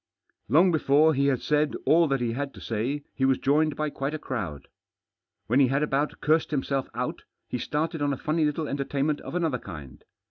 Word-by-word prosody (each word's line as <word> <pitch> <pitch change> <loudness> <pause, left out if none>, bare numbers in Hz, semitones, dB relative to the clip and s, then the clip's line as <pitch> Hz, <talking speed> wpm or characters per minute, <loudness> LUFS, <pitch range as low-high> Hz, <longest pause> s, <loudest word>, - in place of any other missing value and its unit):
Long 170 +8 +5
before 155 0 +4
he 140 0 +2
had 135 -3 0
said 150 0 +1
all 165 +1 +5
that 135 -3 0
he 120 -1 0
had 140 +3 -4
to - - -10
say 125 +6 -2
he 135 - -3
was 135 0 +4
joined 150 +2 +2
by 155 -1 -2
quite 140 +3 -3
a - - -2
crowd. 95 - -5 0.8
When 120 +5 +2
he 135 - +6
had 140 +3 +1
about 145 0 -1
cursed 155 +1 +2
himself 135 -2 -1
out, 125 +1 -3 0.3
he 125 - -3
started 155 +4 -2
on 145 0 +1
a 135 - -2
funny 155 +4 0
little 150 +1 0
enter 140 0 -2
tainment 145 +2 -1
of - - -7
another 160 -8 0
kind. 75 - -10
140 Hz, 210 wpm, -26 LUFS, 130-155 Hz, 0.8 s, he